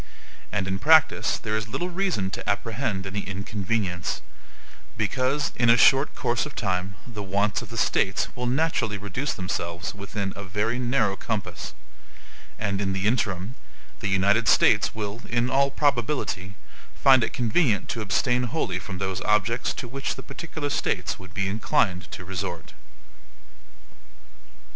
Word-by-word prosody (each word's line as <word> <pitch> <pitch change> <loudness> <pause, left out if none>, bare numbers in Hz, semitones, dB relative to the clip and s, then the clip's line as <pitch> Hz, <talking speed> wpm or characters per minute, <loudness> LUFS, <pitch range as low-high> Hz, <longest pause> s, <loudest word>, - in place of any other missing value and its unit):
And 95 -2 -1
in 95 0 -1
practice 160 +4 +5
there 110 -1 -2
is 110 -1 -2
little 175 +11 -3
reason 175 - 0
to - - -4
apprehend 100 -1 -1
any 95 +1 -3
inconvenience; 100 -2 -2 0.8
because, 130 +7 0
in 120 -1 +4
a 115 - +7
short 135 +3 +5
course 120 +5 0
of 150 - -12
time, 95 -2 -1
the 115 -4 -7
wants 100 +2 0
of - - -9
the 115 - -7
States 100 -2 +2
will 125 0 -2
naturally 125 -6 +1
reduce 105 +9 -3
themselves 85 -2 -3
within 100 -1 -4
A 100 - -6
VERY 105 +6 -1
NARROW 120 -5 +1
COMPASS; 110 -4 -4 0.8
and 100 -2 -1
in 95 -1 0
the 95 +1 -2
interim, 105 -2 0 0.5
the 100 - -2
United 100 +4 +3
States 105 +1 +5
will, 105 +1 -4
in 120 +1 +1
all 140 +1 +4
probability, 120 -9 0 0.4
find 130 -3 +6
it - - -1
convenient 120 - +1
to 115 - -2
abstain 125 +4 +1
wholly 115 - -1
from 90 -1 -7
those 95 -1 -2
objects 105 +3 +1
to 125 - -5
which 135 +3 -3
the - - -9
particular 155 -3 -5
States 95 -7 -1
would 95 -2 -12
be 95 -1 0
inclined 95 -3 +1
to 90 - -7
resort. 90 -2 -5
105 Hz, 150 wpm, -26 LUFS, 95-125 Hz, 0.8 s, a